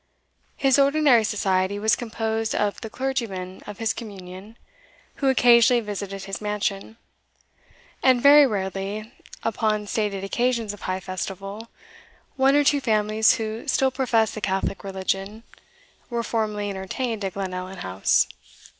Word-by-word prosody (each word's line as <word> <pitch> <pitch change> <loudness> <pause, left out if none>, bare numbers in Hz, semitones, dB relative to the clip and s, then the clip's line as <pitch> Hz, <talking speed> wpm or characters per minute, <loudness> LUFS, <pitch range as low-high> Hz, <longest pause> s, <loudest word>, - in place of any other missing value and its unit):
His 270 0 +3
ordinary 280 -4 +4
society 195 -2 0
was 215 +1 +2
composed 225 -2 -2
of 205 -1 -1
the 225 - -6
clergyman 220 -8 -4
of 205 -1 -7
his 225 -1 0
communion, 200 0 -10 0.6
who 275 - +1
occasionally 240 -1 +5
visited 200 -3 -5
his 195 +1 -6
mansion; 210 +1 -3 1.0
and 255 -2 +4
very 285 +2 +8
rarely, 200 +1 -4 0.3
upon 215 -2 0
stated 205 -2 -2
occasions 235 0 0
of 205 - -12
high 185 0 -3
festival, 195 +3 -6 0.7
one 270 0 +4
or 290 - +5
two 285 0 +3
families 215 -2 +3
who 220 +1 -5
still 265 -1 +2
professed 235 -4 +1
the 215 - -6
Catholic 195 -1 -2
religion 195 +2 -3 0.7
were 235 -1 -2
formally 210 -3 -2
entertained 205 +4 -4
at 190 -2 -3
Glenallan 185 -1 -5
House. 95 +1 +2
215 Hz, 130 wpm, -24 LUFS, 195-235 Hz, 1.0 s, very